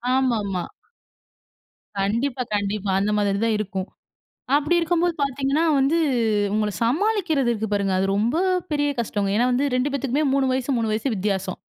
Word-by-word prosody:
ஆமா, 255 -3 +2
ஆமா. 185 -3 -3 1.3
கண்டிப்பா, 240 +6 0
கண்டிப்பா. 205 0 -1
அந்த 210 +1 0
மாதிரி 200 -1 +1
தான் 225 -1 +1
இருக்கும். 195 -2 -3 0.7
அப்பிடி 300 +4 +2
இருக்கும்போது 340 0 +1
பார்த்தீங்கன்னா 275 +3 0
வந்து 275 +5 +2 0.5
அவுங்கள 210 +1 0
சமாளிக்கிறது 315 - +1
இருக்கு 220 -1 -3
பாருங்க! 200 -2 +1
அது 190 - +1
ரொம்ப 230 +9 +1 0.3
பெரிய 290 -1 +1
கஷ்டங்க. 205 -3 -2
ஏன்னா 245 +2 +3
வந்து 270 +3 +1
2 255 +3 +1
பேத்துக்குமே 280 +2 -1
3 270 -1 +2
வயசு, 260 +1 -1
3 225 -1 -1
வயசு 220 +6 -1
வித்தியாசம். 190 -1 -2
240 Hz, 150 wpm, -23 LUFS, 205-280 Hz, 1.3 s, ஏன்னா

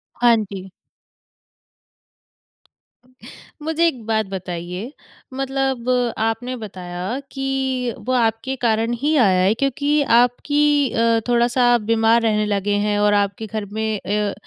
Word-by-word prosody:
हाँ 240 -1 +4
जी। 195 -3 -6 2.9
मुझे 320 +2 +1
एक 250 -8 -3
बात 220 -1 0
बताइए 180 +3 -6 0.4
मतलब 270 -2 -2 0.3
आपने 225 +3 -2
बताया 185 +1 -5
कि 265 -2 -2
वो 255 - +1
आपके 235 +2 0
कारण 230 -1 0
ही 300 +2 +1
आया 190 -7 +4
है 200 +3 +3
क्योंकि 285 +4 0 0.2
आपकी 290 +3 +2
अ, 230 0 +2
थोड़ा-सा 245 0 +3
बीमार 230 +1 +3
रहने 215 -2 +1
लगे 205 0 -1
हैं 205 -1 0
और 205 0 +3
आपके 205 +1 0
घर 215 0 -4
में 220 -1 -2
अ, 205 0 -1
230 Hz, 120 wpm, -20 LUFS, 210-260 Hz, 2.9 s, हाँ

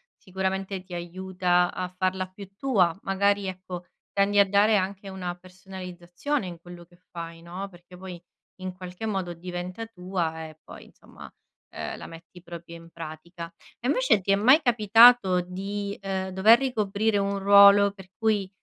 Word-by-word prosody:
sicuramente 190 0 -4
ti 185 - -12
aiuta 180 0 0
a 185 0 -4
farla 185 0 -2
più 190 +1 -12
tua. 195 -9 +1
Magari, 200 0 +1
ecco, 185 -1 -7 0.3
tendi 200 +1 +2
a 200 - +6
dare 205 +2 +4
anche 195 +1 -3
una 180 -2 -5
personalizzazione 185 +5 -6
in 170 -2 -8
quello 175 -1 -12
che 175 0 -24
fai, 165 -1 -8
no, 180 +4 -6
perché 180 0 -16
poi, 180 -2 -9 0.4
in 185 0 -4
qualche 180 +3 -8
modo, 190 -5 -2
diventa 180 +5 -6
tua 180 -5 -4
e 155 0 -15
poi, - - -12
insomma, - - -15 0.5
uhm, - - -5
la - - -9
metti 165 +2 -13
proprio 170 -1 -10
in 165 0 -15
pratica. 170 +1 -9 0.3
E, 245 - -2
invece, 255 -7 +3
ti 195 - 0
è 195 - +6
mai 260 +10 +5
capitato 225 -5 +6
di, 200 +3 -5
uhm, 190 -1 -3
dover 205 +6 +6
ricoprire 215 -4 0
un 200 0 0
ruolo 200 0 +7
per 190 -2 -14
cui, 210 -4 0
190 Hz, 160 wpm, -26 LUFS, 175-200 Hz, 0.5 s, ruolo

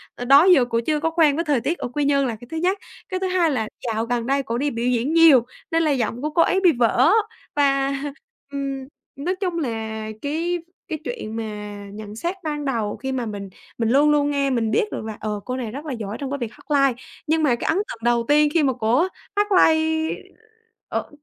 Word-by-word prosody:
ờ, 245 - -5
đó 275 +5 +7
giờ 355 -9 +6
cổ 230 -1 0
chưa 305 -1 +1
có 325 - 0
quen 320 -3 +3
với 335 +3 -1
thời 285 -6 +1
tiết 300 +8 -1
ở - - -4
Quy 295 -1 0
Nhơn 280 -1 +3
là 230 - -3
cái 240 +3 -13
thứ 320 - -4
nhất, 365 +4 +1 0.3
cái 370 - -2
thứ 380 - -1
hai 360 -3 +2
là 220 -6 -1 0.2
dạo 225 0 -1
gần 235 -1 -1
đây 275 +1 +1
cổ 230 -1 -3
đi 285 +3 0
biểu 235 0 -2
diễn 250 +4 +1
nhiều 320 -8 +7 0.3
nên 330 0 +2
là 310 - +2
giọng 245 -2 -1
của 300 - -1
cô 315 +2 +2
ấy 375 - +3
bị 355 - +7
vỡ." 245 +3 +3 0.4
Và, 275 -1 +2 0.6
ừm, 275 -1 -4 0.3
nói 325 +7 -2
chung 365 -3 -2
là 285 -6 -1 0.5
cái 330 +5 -1 0.3
cái 315 -3 -4
chuyện 315 - -5
mà 225 - -2 0.5
nhận 210 0 -8
xét 340 - -3
ban 295 -2 -3
đầu 225 -6 -1
khi 265 +1 -4
mà 255 -2 -2
mình 200 -3 -6 0.3
mình 230 -1 0
luôn 285 +4 +5
luôn 290 -1 +2
nghe 280 -1 +1
mình 230 -4 0
biết 225 - +2
được - - -5
là, 220 -1 -6
ờ, 210 -1 -3
cô 255 - -3
này 235 -4 -4
rất 280 +6 -7
là 290 - -3
giỏi 215 -2 -5
trong 275 -1 -4
cái 285 - -1
việc 235 -4 -4
hát 225 - -16
live, 275 -3 +3 0.3
nhưng 315 +1 +2
mà 260 -5 +3
cái - - -5
ấn - - +2
tượng 395 - -3
đầu 235 0 +2
tiên 295 0 +4
khi 330 - +3
mà 265 -2 +2
cổ 245 +10 +2 0.3
hát 415 0 +2
live 320 -3 +3 0.7
ở - - -3
275 Hz, 240 wpm, -22 LUFS, 235-320 Hz, 0.7 s, đó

